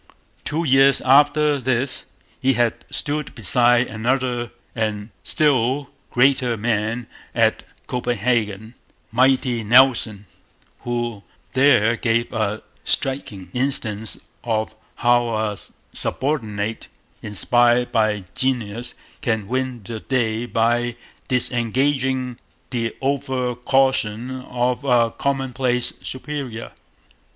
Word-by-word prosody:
Two 160 +3 -1
years 135 -2 +5
after 145 +2 +4
this 130 +1 0 0.4
he 135 +1 +3
had 120 -2 0
stood 150 0 -3
beside 120 +2 +4
another 120 +1 -1 0.3
and 110 -1 -2
still 140 -2 +1 0.2
greater 125 -2 +3
man 115 +2 -1 0.3
at - - +3 0.2
Copenhagen, 115 -3 -1 0.4
'mighty 125 -1 +2
Nelson,' 115 -3 +4 0.5
who 120 -3 -3 0.3
there 130 -4 +4
gave 115 +1 0
a 110 -1 -1 0.2
striking 105 -9 -1
instance 110 -5 -1 0.2
of 110 -2 -1 0.2
how 120 -1 +2
a 105 -2 -2 0.3
subordinate 110 -7 -1 0.3
inspired 120 +4 +2
by 110 -3 +1
genius 120 -3 -1 0.3
can 110 -4 -1
win 130 -1 -2
the 110 +3 -6
day 120 -2 -1
by 120 +1 +1 0.3
disregarding 130 +1 0 0.3
the 115 -3 -2
over 130 -2 -1
caution 125 -2 +1
of 125 +1 -1
a 120 -4 +3
commonplace 130 -2 -1
superior. 130 -4 -5
120 Hz, 95 wpm, -22 LUFS, 110-130 Hz, 0.5 s, years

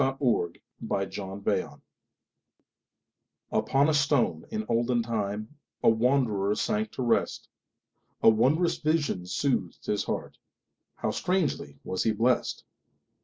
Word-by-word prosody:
Isaacs 135 0 +1
Pillow 100 -5 -1
and 95 - -8
Stone 100 0 -3 1.7
UPON 140 +2 +2
a 155 - +2
stone 145 -3 +2
in 220 -1 -3
olden 120 +1 +1
timeA 105 -2 -2 0.5
wanderer 110 -5 +2
sank 215 - -1
to 130 - -3
rest.A 115 -1 -1
wondrous 140 +10 +3
vision 155 - 0
soothed 95 -3 -1
his 105 - 0
heartHow - - -6
strangely 165 - -1
was 95 - -2
he 110 - +2
blessed! 120 +4 +1
120 Hz, 105 wpm, -28 LUFS, 105-145 Hz, 1.7 s, wondrous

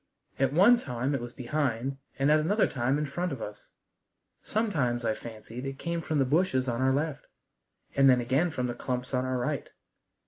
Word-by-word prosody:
At 135 -1 +3
one 200 +11 +6
time 130 - -2
it 135 - -1
was 120 0 -6
behind 130 0 -2 0.2
and 140 +2 +3
at 155 - +6
another 200 +8 +2
time 130 +2 0
in 150 - -1
front 175 +5 -2
of 135 - -4
us. 105 -1 -8 0.7
Sometimes 145 - 0
I 110 - +2
fancied 115 +2 -8
it 135 0 -5
came 170 +2 -2
from 155 -1 -1
the 135 - +3
bushes 140 -2 +2
on 120 0 -1
our 130 0 +3
left, 145 +2 -2 0.7
and 135 0 +6
then 125 -1 +5
again 130 +8 +1
from 125 -5 -2
the 120 - -2
clumps 125 +2 -4
on 130 0 +1
our 130 0 -1
right. 135 +3 -2
135 Hz, 200 wpm, -29 LUFS, 125-155 Hz, 0.7 s, one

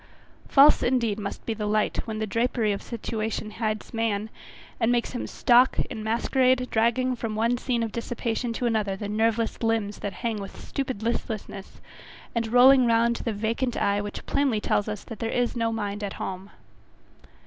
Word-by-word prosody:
False, 285 +2 +6
indeed, 235 -4 +1
must 200 -1 -6
be 225 - -1
the 210 -1 -3
light 215 +3 0
when 220 -1 -3
the 220 - -1
drapery 230 +1 0
of 200 - -3
situation 220 -2 -4
hides 215 -1 -3
the - - -8
man, 220 -1 -1 0.5
and 230 0 +2
makes 240 -1 0
him 245 - -4
stalk 245 +2 +4
in 215 - -5
masquerade, 255 +3 +2
dragging 245 +3 +2
from 230 -2 -4
one 230 +3 +2
scene 245 -1 -1
of 225 - -3
dissipation 235 +1 -3
to 235 +2 -3
another 215 -4 0
the 205 +1 -5
nerveless 225 +2 0
limbs 225 -3 0
that 200 - -4
hang 230 -3 -3
with 195 -1 -8
stupid 260 -6 -4
listlessness, 215 -4 -4 0.5
and 230 -1 -1
rolling 250 +2 +6
round 235 0 +3
the 230 - -3
vacant 225 +4 -1
eye 200 0 +1
which 205 0 -6
plainly 270 -6 +1
tells 205 0 0
us 210 -1 -5
that 225 - -9
there 225 - -2
is 245 0 0
no 230 -1 0
mind 205 -2 -3
at 200 - -3
home. 190 +1 -6
225 Hz, 180 wpm, -26 LUFS, 215-240 Hz, 0.5 s, False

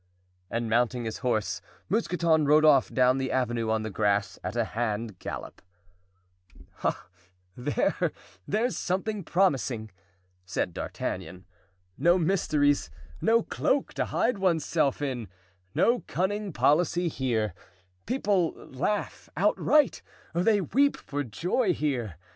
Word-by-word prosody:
And 115 0 -2
mounting 120 +1 +1
his 110 - -4
horse 110 -6 -1 0.3
Mousqueton 170 -7 +2
rode 155 +2 +6
off 140 -4 +5
down 130 +1 +3
the 130 -1 -2
avenue 120 -3 0
on 110 0 +1
the 110 - -4
grass 100 0 0
at 90 +4 -4
a 120 - +2
hand 110 -3 -2
gallop. - - -7 1.2
"Ah, - - -1 0.5
there! 135 +4 0 0.4
there's 230 +5 0
something 195 +2 -2
promising," 135 - +1 0.5
said 90 -1 -2
D'Artagnan. 90 +2 -5 0.5
"No 170 +5 +5
mysteries, 150 - +2 0.3
no 230 0 +4
cloak 275 0 0
to - - -1
hide 230 -4 0
one's 175 -5 +2
self 145 -3 +1
in, 125 -6 -3 0.5
no 240 +1 +3
cunning 200 +2 -1
policy 170 +3 +2
here; 120 -8 -1 0.5
people 205 -9 +1
laugh 180 +11 -3
outright, 300 -3 +3 0.3
they 200 +5 +3
weep 280 - +2
for 145 0 -4
joy 180 - 0
here. 125 - -2
145 Hz, 120 wpm, -28 LUFS, 115-185 Hz, 1.2 s, rode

